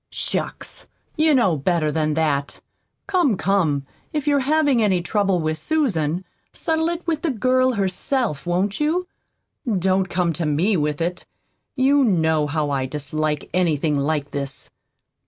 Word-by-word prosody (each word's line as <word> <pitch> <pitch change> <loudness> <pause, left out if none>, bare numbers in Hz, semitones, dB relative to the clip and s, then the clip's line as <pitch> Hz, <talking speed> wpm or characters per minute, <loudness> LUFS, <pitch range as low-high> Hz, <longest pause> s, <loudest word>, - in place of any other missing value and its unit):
"Shucks! - - -4 0.3
You 310 -1 +4
know 190 -10 +3
better 155 +1 +1
than 155 -1 0
that! 145 -3 0 0.5
Come, 350 - +2
come, 165 -9 +1 0.3
if 300 -3 -2
you're 290 -1 +3
having 285 -2 +2
any 195 -4 +3
trouble 195 +1 +1
with 155 -1 -2
Susan, 185 - 0 0.3
settle 320 0 0
it 345 0 -4
with 325 -3 -1
the 335 - 0
girl 255 +1 +2
herself, 195 - -1
won't 190 +3 0
you? 335 +5 0 0.7
Don't 190 +1 +1
come 180 -2 0
to 160 +2 -2
me 170 +8 +2
with 150 -1 -1
it. 175 +2 -3 0.5
You 275 +1 +4
KNOW 160 - +2
how 150 0 -1
I 135 -2 -1
dislike 150 +1 -3
anything 160 -4 +1
like 145 0 -1
this." 140 -1 -6
180 Hz, 145 wpm, -22 LUFS, 155-260 Hz, 0.7 s, You